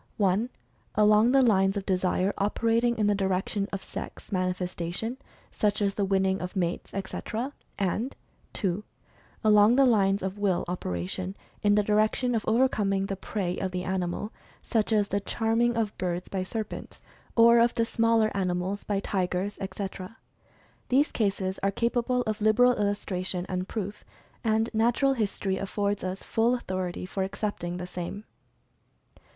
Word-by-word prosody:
(1) 205 Hz, +4 st, +2 dB, 0.5 s
along 210 Hz, +2 st, +5 dB
the 270 Hz, 0 st, +5 dB
lines 195 Hz, -4 st, +3 dB
of 195 Hz, -, -3 dB
Desire 185 Hz, +1 st, +1 dB
operating 230 Hz, +3 st, +1 dB
in 215 Hz, -, +2 dB
the 205 Hz, -, +4 dB
direction 195 Hz, +1 st, 0 dB
of 195 Hz, -1 st, -4 dB
Sex -, -, -8 dB
manifestation, 185 Hz, +4 st, -2 dB, 0.3 s
such 210 Hz, -1 st, 0 dB
as 200 Hz, -1 st, +1 dB
the 205 Hz, -, -1 dB
winning 190 Hz, 0 st, +1 dB
of 180 Hz, +3 st, -5 dB
mates, 175 Hz, -2 st, -2 dB
etc.; 225 Hz, +6 st, -4 dB, 0.2 s
and 205 Hz, +7 st, -1 dB, 0.4 s
(2) 195 Hz, 0 st, 0 dB, 0.6 s
along 210 Hz, +1 st, +6 dB
the 275 Hz, +1 st, +6 dB
lines 200 Hz, -5 st, +3 dB
of 190 Hz, +2 st, -3 dB
Will 195 Hz, -3 st, +1 dB
operation 175 Hz, -, -3 dB, 0.3 s
in 205 Hz, -1 st, +4 dB
the 210 Hz, -, +4 dB
direction 215 Hz, +4 st, +2 dB
of 225 Hz, -2 st, 0 dB
overcoming 210 Hz, -5 st, +2 dB
the 195 Hz, -, -3 dB
Prey 190 Hz, -2 st, -3 dB
of 190 Hz, -, -1 dB
the 180 Hz, 0 st, -3 dB
animal, 185 Hz, +3 st, -2 dB, 0.3 s
such 225 Hz, -2 st, 0 dB
as 210 Hz, -2 st, +2 dB
the 200 Hz, -, +1 dB
"charming" 230 Hz, +3 st, +1 dB
of 215 Hz, -2 st, -1 dB
birds 180 Hz, 0 st, -2 dB
by 190 Hz, -, -2 dB
serpents, 215 Hz, +3 st, -5 dB, 0.4 s
or 235 Hz, 0 st, +7 dB
of 235 Hz, 0 st, +4 dB
smaller 230 Hz, -1 st, +3 dB
animals 185 Hz, +1 st, -1 dB
by 205 Hz, -2 st, -1 dB
tigers, 190 Hz, 0 st, -1 dB
etc. 195 Hz, +1 st, -5 dB, 0.7 s
These 275 Hz, +4 st, +3 dB
cases 195 Hz, -3 st, -1 dB
are 195 Hz, -, +2 dB
capable 240 Hz, +3 st, 0 dB
of 215 Hz, -2 st, -3 dB
liberal 245 Hz, +4 st, +5 dB
illustration 190 Hz, -3 st, -2 dB
and 185 Hz, 0 st, -3 dB
proof, 205 Hz, -1 st, -5 dB, 0.4 s
and 220 Hz, 0 st, +2 dB
natural 240 Hz, +5 st, +3 dB
history 200 Hz, -4 st, -1 dB
affords 200 Hz, +1 st, -1 dB
us 185 Hz, +1 st, -4 dB
full 230 Hz, +2 st, +2 dB
authority 185 Hz, -7 st, -3 dB
for 190 Hz, +1 st, -4 dB
accepting 190 Hz, -2 st, -3 dB
the 180 Hz, -, -4 dB
same. 180 Hz, +3 st, -6 dB
200 Hz, 150 wpm, -27 LUFS, 185-225 Hz, 0.7 s, or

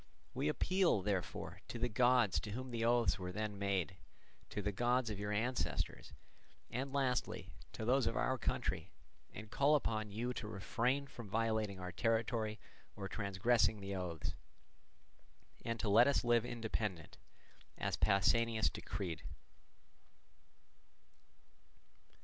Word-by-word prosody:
We 135 Hz, +3 st, -1 dB
appeal, 175 Hz, -, +2 dB
therefore, 95 Hz, -3 st, -2 dB
to -, -, -5 dB
the 120 Hz, +1 st, +1 dB
gods 120 Hz, -6 st, +4 dB
to 105 Hz, -, -6 dB
whom 130 Hz, +2 st, -5 dB
the 115 Hz, -1 st, -1 dB
oaths 120 Hz, -2 st, +3 dB
were 90 Hz, -1 st, -4 dB
then 105 Hz, 0 st, -3 dB
made, 95 Hz, -3 st, 0 dB, 0.5 s
to -, -, -4 dB
the 105 Hz, -, 0 dB
gods 120 Hz, +3 st, +1 dB
of 100 Hz, -, -4 dB
your 105 Hz, 0 st, -2 dB
ancestors, 120 Hz, +5 st, -1 dB, 0.6 s
and 135 Hz, +3 st, -2 dB
lastly 130 Hz, -4 st, -1 dB, 0.2 s
to 110 Hz, -, -4 dB
those 130 Hz, +3 st, +3 dB
of -, -, -1 dB
our 130 Hz, -1 st, +1 dB
country, -, -, -1 dB, 0.4 s
and 105 Hz, +1 st, -9 dB
call 145 Hz, +2 st, +4 dB
upon 110 Hz, -6 st, 0 dB
you 120 Hz, +5 st, -2 dB
to 110 Hz, -, -5 dB
refrain 115 Hz, +7 st, 0 dB
from 120 Hz, -6 st, -10 dB
violating 110 Hz, -2 st, 0 dB
our 90 Hz, 0 st, -5 dB
territory 110 Hz, +1 st, 0 dB, 0.4 s
or 100 Hz, -2 st, -4 dB
transgressing 105 Hz, +3 st, +2 dB
the 100 Hz, 0 st, -5 dB
oaths, 90 Hz, -4 st, -3 dB, 1.3 s
and 115 Hz, -1 st, -2 dB
to 105 Hz, -, -1 dB
let 110 Hz, +5 st, +7 dB
us 140 Hz, -, +2 dB
live 120 Hz, -1 st, +3 dB
independent, 110 Hz, -7 st, -3 dB, 0.6 s
as -, -, -1 dB
Pausanias 110 Hz, +3 st, +3 dB
decreed." 90 Hz, -4 st, -4 dB
110 Hz, 130 wpm, -37 LUFS, 100-120 Hz, 1.3 s, let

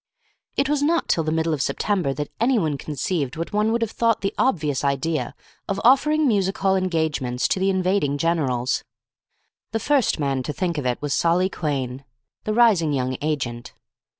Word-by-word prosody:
It 275 Hz, -, +2 dB
was 295 Hz, 0 st, +1 dB
not 330 Hz, +3 st, +1 dB
till 165 Hz, -, +1 dB
the 155 Hz, -, -1 dB
middle 160 Hz, 0 st, 0 dB
of 145 Hz, -, -2 dB
September 185 Hz, -2 st, 0 dB
that 145 Hz, +1 st, -4 dB
anyone 220 Hz, -, +2 dB
conceived 145 Hz, -1 st, -3 dB
what 165 Hz, +4 st, -4 dB
one 210 Hz, +1 st, +2 dB
would 230 Hz, 0 st, +1 dB
have 225 Hz, -, -3 dB
thought 230 Hz, -2 st, +1 dB
the 195 Hz, -, -1 dB
obvious 150 Hz, -, 0 dB
idea 140 Hz, +3 st, -1 dB, 0.3 s
of 195 Hz, 0 st, -2 dB
offering 300 Hz, +5 st, +4 dB
music 195 Hz, -4 st, +1 dB
hall 195 Hz, 0 st, +2 dB
engagements 160 Hz, -9 st, 0 dB
to -, -, +1 dB
the 190 Hz, +1 st, +2 dB
invading 185 Hz, -6 st, +1 dB
generals. 140 Hz, -6 st, 0 dB, 0.9 s
The 225 Hz, -, 0 dB
first 270 Hz, -, +1 dB
man 135 Hz, -2 st, 0 dB
to 145 Hz, -, -4 dB
think 170 Hz, -3 st, -2 dB
of 130 Hz, -, -2 dB
it 125 Hz, -, -1 dB
was 145 Hz, -1 st, -1 dB
Solly 175 Hz, +4 st, +2 dB
Quhayne, 135 Hz, -4 st, -3 dB, 0.4 s
the 215 Hz, -, 0 dB
rising 200 Hz, -11 st, +4 dB
young 130 Hz, -1 st, -1 dB
agent. 130 Hz, -6 st, -3 dB
165 Hz, 180 wpm, -23 LUFS, 145-205 Hz, 0.9 s, offering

